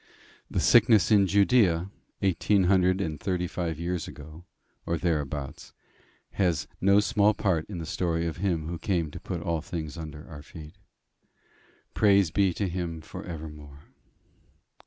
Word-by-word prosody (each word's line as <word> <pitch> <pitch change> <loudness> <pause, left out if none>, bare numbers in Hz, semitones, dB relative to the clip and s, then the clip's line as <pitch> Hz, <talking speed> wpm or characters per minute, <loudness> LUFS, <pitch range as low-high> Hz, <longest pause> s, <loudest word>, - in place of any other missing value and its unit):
The - - -1
sickness 110 -6 +5
in 100 -2 +5
Judaea 100 -3 +3 0.3
eighteen 95 +1 +2
hundred 95 0 +3
and 80 -5 -3
thirty 90 0 -1
five 85 -3 -4
years 85 0 -3
ago, 80 +3 -11 0.4
or 85 - -1
thereabouts, 75 -5 -3 0.6
has 85 -9 0
no 100 +2 +5
small 105 0 +2
part 90 -7 0
in 100 - -6
the 85 - -5
story 85 0 -1
of 85 0 -3
him 85 -4 -1
who 85 0 -5
came 85 -4 -1
to - - -8
put 85 -2 -5
all 85 -2 -1
things 80 -2 -6
under 75 -1 -8
our 75 -4 -10
feet. 75 0 -12 1.2
Praise 100 -5 +4
be 100 0 +2
to 100 - -1
him 85 -2 -4
for 80 - -9
evermore! 75 -4 -9
85 Hz, 150 wpm, -27 LUFS, 80-95 Hz, 1.2 s, sickness